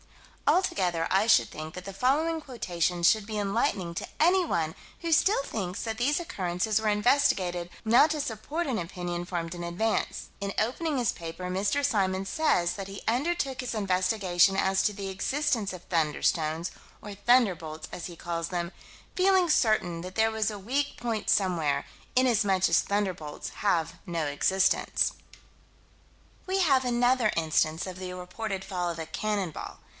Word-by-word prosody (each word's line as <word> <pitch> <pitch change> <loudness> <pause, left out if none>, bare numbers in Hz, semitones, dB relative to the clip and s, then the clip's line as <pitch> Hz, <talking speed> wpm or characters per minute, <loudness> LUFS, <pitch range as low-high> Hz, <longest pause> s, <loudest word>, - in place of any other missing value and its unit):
Altogether 180 - +2
I 195 +3 +3
should 225 - +5
think 155 +1 -8
that 180 0 -8
the 195 - -6
following 310 +9 +1
quotation 180 - -2
should 215 +4 +4
be 215 0 -4
enlightening 200 -3 0
to - - -4
anyone 320 - +2 0.2
who 335 - -3
still 385 +2 +4
thinks 190 -8 -4
that 225 -1 -3
these 290 +6 +2
occurrences 200 - -1
were 215 - +1
investigated 200 -6 +2 0.2
not 235 +7 +6
to 305 0 -1
support 285 +7 -3
an 255 -5 -1
opinion 175 0 -4
formed 175 -1 -4
in 175 - -6
advance: 180 +6 -1
In 200 0 -2
opening 280 +7 0
his 240 -3 +2
paper, 165 +2 -7
Mr. 195 +9 +1
Symons 195 -6 0
says 180 - +2
that 195 -1 -6
he 195 - -8
undertook 270 +2 0
his 250 -2 -4
investigation 185 -2 +2
as 190 0 +2
to - - +2
the 200 -1 -6
existence 230 +2 0
of 180 -1 -10
"thunderstones," 160 0 0 0.3
or 205 - -7
"thunderbolts" 195 -8 +1
as 175 - -6
he 175 - -9
calls 170 0 -3
them 175 -1 -3 0.4
"feeling 375 -1 +4
certain 215 - +2
that 185 +2 -8
there 225 0 +3
was 220 0 0
a 205 - -7
weak 270 +8 -1
point 225 -3 -2
somewhere, 170 -7 +1 0.3
inasmuch 205 -7 +3
as - - +4
'thunderbolts' 185 -7 -3
have 170 -6 +1
no 170 -3 -1
existence." 185 +7 +2 1.3
We 380 +1 0
have 275 -8 +4
another 245 -2 +2
instance 160 0 +1
of 185 0 -7
the 185 -1 -5
reported 190 +2 -5
fall 180 -3 -2
of 165 -1 -5
a 160 - -3
"cannon 205 -2 -2
ball." - - -8
195 Hz, 160 wpm, -28 LUFS, 175-240 Hz, 1.3 s, not